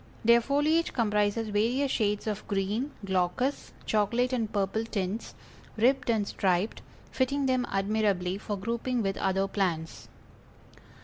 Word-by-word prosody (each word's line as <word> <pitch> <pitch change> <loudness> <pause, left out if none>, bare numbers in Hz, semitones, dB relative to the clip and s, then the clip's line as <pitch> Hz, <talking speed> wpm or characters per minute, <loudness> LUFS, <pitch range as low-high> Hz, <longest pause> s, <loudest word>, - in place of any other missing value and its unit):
Their 235 +1 +6
foliage 295 +6 +1
comprises 210 -1 +1
various 240 +7 +1
shades 210 -2 0
of 215 -1 -4
green, 205 +7 -1 0.2
glaucous, 190 +8 -1
chocolate 235 +4 +1
and 225 -4 -1
purple 205 +1 0
tints, 210 -1 -3 0.4
ribbed 255 +3 +2
and 215 -3 +1
striped, 185 +2 0 0.3
fitting 275 +2 0
them 255 -2 +1
admirably 195 -2 0
for 205 -1 -4
grouping 235 +3 -2
with 195 -1 -1
other 195 0 +1
plants. 175 -5 -2
215 Hz, 125 wpm, -28 LUFS, 195-245 Hz, 0.4 s, Their